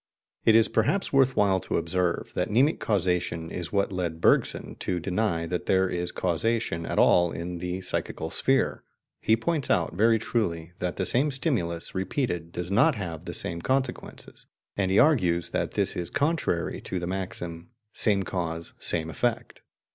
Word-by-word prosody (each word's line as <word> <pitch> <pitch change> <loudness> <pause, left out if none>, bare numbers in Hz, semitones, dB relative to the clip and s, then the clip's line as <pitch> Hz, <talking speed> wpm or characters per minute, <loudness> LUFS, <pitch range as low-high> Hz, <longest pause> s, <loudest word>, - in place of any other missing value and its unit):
It 110 - +6
is 115 -1 +6
perhaps 145 - 0
worth 135 -1 +4
while 95 -2 +3
to - - -2
observe 85 +1 -1
that - - -1
mnemic 130 +9 +3
causation 90 -4 0
is 85 -2 -4
what 100 -1 +1
led 85 -3 -3
Bergson - - +2
to 90 -1 -1
deny 90 -2 -1
that 90 +1 -3
there 95 0 +3
is 90 -1 -2
causation 90 -1 -1
at - - -3
all 85 -1 +5
in 85 +1 -5
the 90 +2 -3
psychical 80 -3 -3
sphere. 135 -1 +1 0.4
He 110 - +3
points 155 +4 -1
out, 85 - +1
very 115 +4 +4
truly, 85 -8 -2
that 90 -1 -2
the 95 - -1
same 135 +9 +3
stimulus, 120 - -2
repeated, 95 - -2
does 90 +1 -5
not 100 - +4
have 85 -7 -6
the - - -5
same 85 0 -3
consequences, 130 +3 -3 0.3
and 95 -2 0
he 95 - +2
argues 90 - +3
that - - -1
this - - 0
is 85 -1 -3
contrary 145 - 0
to 95 - -4
the 85 - -4
maxim, 90 -1 -5 0.2
"same 100 -3 +1
cause, 85 -3 -4
same 80 -2 -1
effect." 115 +8 -2
95 Hz, 170 wpm, -27 LUFS, 85-115 Hz, 0.4 s, It